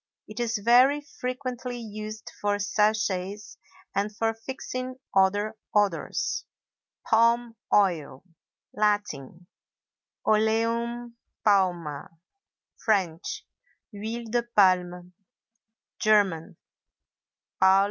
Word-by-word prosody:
It 215 +2 -8
is 235 -1 0
very 245 +7 +5 0.2
frequently 250 -1 -4
used 215 -1 -7
for 205 0 +1
sachets 205 -1 0 0.3
and 200 +1 0
for 225 0 +1
fixing 255 +2 -6 0.2
other 205 +3 +3 0.2
odors. 205 -5 +1 0.6
PALM 230 +1 +3 0.2
OIL. 170 -9 +2 0.5
Latin—Oleum 220 - -2 0.3
Palmæ; 175 -8 +2 0.8
French—Huile 210 +3 -3
de 240 0 +2
Palme; 180 -5 +2 0.9
German—Palmöl. 200 -7 +2
215 Hz, 65 wpm, -27 LUFS, 190-235 Hz, 0.9 s, very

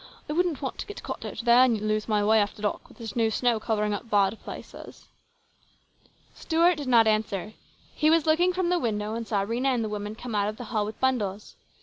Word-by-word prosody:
I 300 - -3
wouldn't 335 -4 0
want 265 - -4
to - - -5
get 415 - -9
caught - - -6
out - - -6
there 240 +1 +7
and 235 -4 +2
lose 215 0 -1
my 210 -2 +1
way 220 +1 +5
after 205 0 -2
dark 210 - -2
with - - -18
this 225 -4 -7
new 225 -2 +2
snow 235 +1 +1
covering 210 -1 -1
up 225 +3 -6
bad 205 0 +2
places." - - -10 1.3
Stuart 335 +1 +2
did 290 -3 -5
not 235 -3 +5
answer. 215 -1 -1 0.4
He 310 - +2
was 325 -1 +4
looking 335 +3 +3
from 365 -1 -1
the 355 0 +2
window 210 -4 -2
and 230 0 -4
saw 200 -3 0
Rhena 235 +5 -1
and 250 -4 +1
the 215 - -3
woman 210 0 -5
come 240 0 -7
out 205 0 +1
of 215 - -7
the - - -7
hall 210 -2 +1
with 215 - -8
bundles. 215 -6 -1
225 Hz, 230 wpm, -26 LUFS, 210-260 Hz, 1.3 s, there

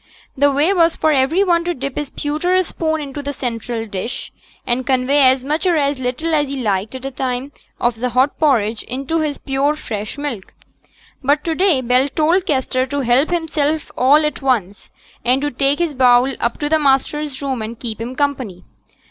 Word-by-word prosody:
The 285 +1 +3
way 295 +7 +2
was 335 -3 +3
for 315 - +2
every 290 +7 +3
one 345 -3 +2
to 350 0 -1
dip 275 0 -5
his 295 -2 -3
pewter 310 +7 0
spoon 315 -2 -2
into 285 0 -6
the 285 0 -4
central 230 -3 -4
dish, 205 +3 -5 0.3
and 245 +2 0
convey 260 +2 +2
as 260 0 +1
much 305 +6 -1
or 345 -3 +3
as 280 -2 0
little 260 +6 -2
as 295 -2 +1
he 275 - -4
liked 210 0 -1
at 260 0 -7
a 270 - -3
time 255 +1 -3 0.3
of 240 -2 0
the 250 +1 -1
hot 255 +4 +1
porridge 230 -8 +2
into 270 +6 -3
his 300 -2 -1
pure 275 +2 0
fresh 215 -7 -5
milk. 270 -10 -5 0.7
But 290 +3 +2
to 330 - -1
day 345 -5 +2
Bell 250 +3 +2
told 335 +7 +1
Kester 260 -3 0
to 285 +2 -2
help 255 +4 +2
himself 315 -3 -1
all 290 +5 +4
at 300 - -3
once, 215 -8 -1 0.3
and 250 +2 +3
to 290 - -1
take 275 +3 +1
his 340 -3 -1
bowl 255 0 +4
up 235 - -1
to 295 - 0
the 315 +1 +2
master's 280 0 0
room 265 -4 -3
and 220 +1 -6
keep 225 -2 -5
him 245 +3 -5
company. 255 -10 -2
275 Hz, 200 wpm, -18 LUFS, 250-300 Hz, 0.7 s, all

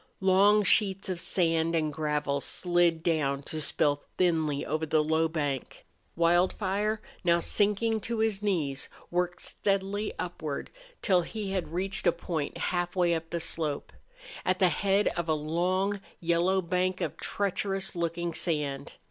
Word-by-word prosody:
Long 200 +2 +5
sheets 195 0 +3
of 180 -2 -3
sand 165 -2 +2
and 155 -2 0
gravel 150 -2 -1
slid 175 -1 +2
down 145 -5 0
to 155 +2 -4
spill 145 -1 +2 0.2
thinly 160 -5 +1
over 155 +2 -2
the 155 0 +2
low 160 +1 +2
bank. 145 -5 -3 0.3
Wildfire, 190 +5 +1 0.2
now 170 -1 +4
sinking 210 +5 +1
to 230 +3 -3
his 220 -2 +1
knees, 155 -10 -1 0.2
worked 175 0 -1
steadily 200 +1 -1
upward 155 -5 -4 0.3
till 185 -4 +4
he 205 +2 -5
had 190 -2 -1
reached 195 +5 -1
a - - +7
point 165 -3 -4
halfway 175 -1 0
up 165 0 -3
the 170 - -2
slope, 155 -3 -3 0.5
at 185 0 +1
the 185 -2 +4
head 195 +5 +2
of 170 -1 -3
a 155 - +3
long, 185 +6 0 0.2
yellow 175 +3 +2
bank 185 +1 0
of - - -2
treacherous 195 -1 -1
looking 170 0 -2
sand. 145 -5 -2
175 Hz, 145 wpm, -29 LUFS, 160-195 Hz, 0.5 s, a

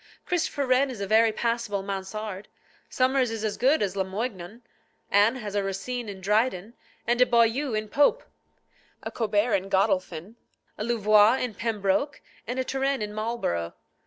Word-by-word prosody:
Christopher 320 -5 -1
Wren 260 +2 +3
is 245 -5 -7
a 200 - -2
very 220 +2 +4
passable 230 -3 -2
Mansard; 195 +1 -5 0.4
Somers 255 -1 +2
is 225 -1 -5
as 215 -2 -1
good 270 +1 +2
as 195 -1 -2
Lamoignon; 195 +2 -4 0.5
Anne 205 +5 +4
has 210 -5 -6
a 205 - +1
Racine 220 +4 -4
in 195 -2 -8
Dryden, 210 +1 0 0.3
a 240 - +3
Boileau 235 +2 +2
in 215 0 -2
Pope, 290 - +2 0.8
a - - -5
Colbert 215 0 0
in 195 0 0
Godolphin, 190 0 0 0.4
a - - -5
Louvois 215 -1 +4
in 250 -3 -3
Pembroke, 210 +6 -1 0.3
and 245 - -3
a 260 - 0
Turenne 270 -2 -1
in 210 0 -5
Marlborough. 215 - -3
220 Hz, 155 wpm, -26 LUFS, 200-245 Hz, 0.8 s, very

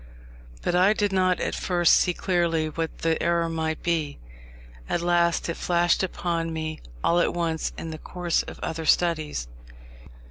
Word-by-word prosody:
But - - 0
I 185 +4 +5
did 205 -2 0
not 185 -1 +2
at - - -2
first 175 -2 +3
see 180 - +3
clearly 170 -3 0
what 165 +1 -5
the 165 -1 +1
error 170 0 +1
might 160 -1 -2
be. 160 -4 -1 0.7
At 175 - 0
last 170 -1 +2
it 170 - -1
flashed 175 -1 +2
upon 170 -3 -2
me 155 -1 -4 0.2
all 170 - +3
at 175 - +1
once 165 -2 -1
in 165 - -5
the 155 - -7
course 175 0 -1
of - - -10
other 160 -1 -3
studies. 155 - +1
170 Hz, 165 wpm, -25 LUFS, 160-175 Hz, 0.7 s, I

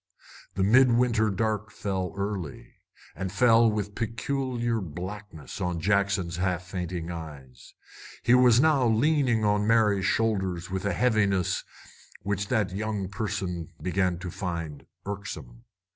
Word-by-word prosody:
The 95 - +1
midwinter 120 0 +4
dark 105 +1 -1
fell 95 -4 -3
early, 100 -7 -4 0.4
and 95 -1 -4
fell 115 -1 +5
with 105 -1 -3
peculiar 120 +1 -2
blackness 90 +1 -7
on 90 -2 -1
Jackson's 100 -2 +1
half 90 -1 -1
fainting 90 -2 -4
eyes. 75 -7 -10 0.5
He 120 - +4
was 125 -1 +6
leaning 135 -3 +3
now 105 - +4
on 105 0 0
Mary's 105 -4 +3
shoulders 95 -6 0
with 95 +1 -3
a 100 - +1
heaviness 100 -7 +1 0.6
which 100 0 -2
that 110 -6 +1
young 100 -1 -3
person 100 -5 -4
began 90 -1 0
to 90 0 -6
find 85 -6 -5 0.2
irksome. 100 +4 -7
100 Hz, 125 wpm, -27 LUFS, 90-115 Hz, 0.6 s, was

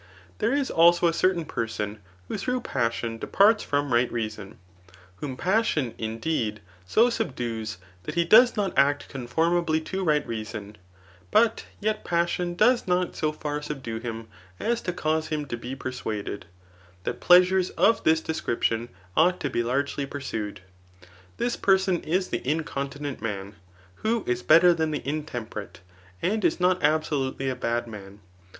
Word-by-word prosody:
There - - +1
is 280 -1 0
also 170 +1 +5
a 170 - +5
certsun 170 -1 +1
person 110 -2 -3 0.3
who - - -4
through 250 0 -1
passion 115 -2 -2
departs 210 - +4
from 145 -2 -1
right 120 +1 +3
reason, 110 -4 -5 0.6
whom 130 +3 -5
passion, 180 - +1
indeed, 110 -1 -2 0.3
so 235 - +4
subdues, 115 - -3 0.3
that - - -5
he 170 0 +2
does 235 +7 +6
not 195 -3 0
act 145 +1 +2
conformably 160 +5 0
to 190 +4 -4
right 150 -4 +2
reason; 110 -2 -6 0.5
but 225 - +3
yet 215 0 -1
passion 175 0 0
does 245 +5 +3
not 180 0 +1
so 155 -1 0
far 150 -1 -4
subdue 130 -6 -5
him 115 -1 -6 0.3
as 235 +1 0
to 180 - -2
cause 155 -2 -1
him 150 -1 -2
to 125 - -4
be 120 +3 -6
persuaded, 110 -7 -5 0.6
that - - -3
pleasures 180 +1 +5
of 225 +1 +2
this 160 0 +4
description 120 -7 -1 0.3
ought 180 +3 +4
to 140 - -2
be 120 - 0
largely 140 +3 -1
pursued. 110 -8 -5 0.8
This 240 0 0
person 190 -2 +2
is 185 +4 -1
the - - -2
incontinent 145 -1 -3
man, 100 -2 -4 0.4
who 225 0 0
is 125 0 -1
better 170 +6 +6
than 160 -2 0
the 150 -3 -4
intemperate, 115 - -5 0.4
and 210 +3 0
is 170 0 +2
not 180 0 +2
absolutely 145 -3 0
a 130 - -2
bad 120 -1 -1
man. 100 -2 -10
150 Hz, 150 wpm, -26 LUFS, 115-180 Hz, 0.8 s, does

